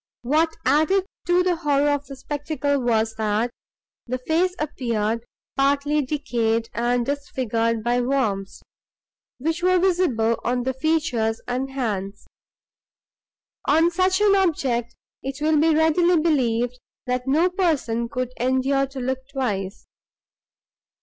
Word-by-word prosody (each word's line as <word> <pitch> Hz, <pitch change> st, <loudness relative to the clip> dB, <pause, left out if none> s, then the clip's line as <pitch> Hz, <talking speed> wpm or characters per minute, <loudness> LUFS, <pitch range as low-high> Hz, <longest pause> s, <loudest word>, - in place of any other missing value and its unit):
What 315 Hz, +6 st, +1 dB
added 365 Hz, +6 st, +3 dB, 0.2 s
to 350 Hz, +1 st, +4 dB
the 360 Hz, -2 st, +1 dB
horror 290 Hz, -2 st, +2 dB
of 285 Hz, 0 st, -2 dB
the 275 Hz, -, -8 dB
spectacle, 285 Hz, +1 st, -2 dB
was, 225 Hz, -2 st, +1 dB
that 215 Hz, +2 st, 0 dB, 0.6 s
the 255 Hz, +1 st, -2 dB
face 335 Hz, +8 st, 0 dB
appeared 230 Hz, -7 st, -2 dB, 0.3 s
partly 285 Hz, +2 st, +2 dB
decayed 235 Hz, -5 st, -1 dB
and 240 Hz, 0 st, 0 dB
disfigured 230 Hz, -5 st, -1 dB
by 240 Hz, +1 st, +1 dB
worms, 220 Hz, -7 st, -1 dB, 0.7 s
which 320 Hz, +6 st, -2 dB
were 365 Hz, +1 st, +4 dB
visible 340 Hz, -12 st, +2 dB
on 245 Hz, 0 st, 0 dB
the 260 Hz, +1 st, -1 dB
features 260 Hz, -6 st, 0 dB
and 255 Hz, +2 st, -2 dB
hands. 205 Hz, -7 st, -3 dB, 1.4 s
On 325 Hz, +4 st, +4 dB
such 370 Hz, +2 st, +2 dB
an 410 Hz, -1 st, +5 dB
object, 260 Hz, -10 st, 0 dB, 0.3 s
it 270 Hz, +1 st, -5 dB
will 305 Hz, 0 st, +2 dB
be 320 Hz, +1 st, +4 dB
readily 325 Hz, +2 st, +3 dB
believed, 250 Hz, -6 st, +1 dB, 0.3 s
that 250 Hz, 0 st, -2 dB
no 325 Hz, +7 st, +3 dB
person 280 Hz, -11 st, 0 dB
could 255 Hz, +1 st, -3 dB
endure 260 Hz, +2 st, +1 dB
to 270 Hz, 0 st, -8 dB
look 260 Hz, +1 st, -1 dB
twice. 210 Hz, -8 st, -3 dB
270 Hz, 125 wpm, -23 LUFS, 235-315 Hz, 1.4 s, an